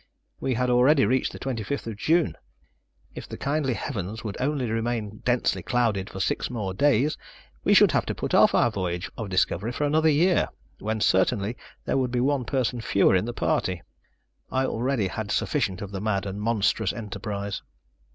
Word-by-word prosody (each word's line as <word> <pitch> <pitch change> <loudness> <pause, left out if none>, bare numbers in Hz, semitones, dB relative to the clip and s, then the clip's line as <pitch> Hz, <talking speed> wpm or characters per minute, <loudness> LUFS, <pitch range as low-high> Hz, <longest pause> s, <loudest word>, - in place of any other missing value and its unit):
We 130 - -1
had 125 +1 +1
already 130 +3 +5
reached 130 +1 +1
the - - -8
25th 115 -2 -4
June. 160 +9 +2 0.8
If - - -9
the - - -6
kindly 140 -3 0
heavens 110 -2 -4
would 105 -3 -4
only 135 -2 0
remain 115 -2 -2
densely 125 0 +1
clouded 110 -6 0
for 95 - -7
six 95 - -1
more 105 -6 -3
days, 145 +6 +2 0.4
we - - +4
should - - +7
have - - +1
to - - -2
put - - -4
off - - +6
our 120 - +4
voyage 90 -3 -3
of 110 -3 -5
discovery 95 +3 +1
for 140 - -3
another 155 +2 +3
year, 170 +4 +3 0.3
when 110 +1 -2
certainly 100 +4 +2 0.3
there - - 0
would 130 -1 0
be 125 0 -1
one 135 0 +1
person 125 -3 -1
fewer 100 -3 +3
in 95 - +2
the 120 - -3
party. 85 -2 -1 0.7
I 130 0 +1
already 120 -4 0
had 105 +2 -5
sufficient 95 -2 0
of 100 - -7
the 95 -1 -4
mad 105 -2 0
and 100 +1 -5
monstrous 110 -2 +1
enterprise. 100 -2 -5
115 Hz, 180 wpm, -26 LUFS, 100-130 Hz, 0.8 s, should